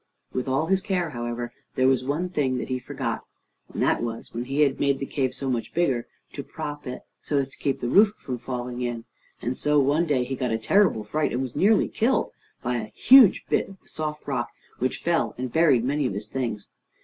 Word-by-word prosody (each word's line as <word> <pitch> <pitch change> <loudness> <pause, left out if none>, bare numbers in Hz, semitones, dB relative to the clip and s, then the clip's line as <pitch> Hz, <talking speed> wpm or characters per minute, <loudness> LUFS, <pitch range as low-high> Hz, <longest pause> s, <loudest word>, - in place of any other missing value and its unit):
With 130 +1 -2
all 135 +4 +1
his 190 +2 +2
care, 180 -5 -1
however, 120 -1 -4 0.2
there 130 0 +3
was 130 -1 +3
one 150 +7 -1
thing 140 -7 0
that 125 - -4
he 130 0 -1
forgot, - - -4 0.5
and - - -1
that - - +2
was, 115 -1 -5
when 120 +1 -3
he 135 +3 0
had 140 -2 +3
made 140 -1 +2
the 135 - -4
cave 135 -2 -1
so 135 - -5
much 120 -3 -2
bigger, 135 -9 +1 0.3
to 140 - -4
prop 145 -1 -6
it, 125 - -6 0.2
so 145 - -1
as 135 -1 0
to - - -15
keep 135 -2 -1
the 120 - -1
roof 205 - +5
from 125 -2 -5
falling 125 -1 -4
in. 120 -2 -3 0.4
And 125 +2 -1
so 150 +2 +2
one 145 +5 +2
day 135 -5 +2
he 135 +2 -3
got 125 -1 -1
a 110 - +1
terrible 145 - +3
fright, 150 +9 -1
and 125 - -1
was 130 - -6
nearly 210 +3 +4
killed, 245 +4 +1 0.3
by 120 0 0
a 110 -2 -5
huge 260 -6 +7
bit - - +1
of 195 -1 -13
the - - -18
soft 150 -1 -5
rock 125 -4 -1 0.3
which 130 +1 -1
fell 170 -1 +1
and 125 -1 -4
buried 155 -8 +4
many 140 +2 +1
of 100 - -4
his 105 +1 -5
things. 115 -6 -4
135 Hz, 230 wpm, -25 LUFS, 120-150 Hz, 0.5 s, huge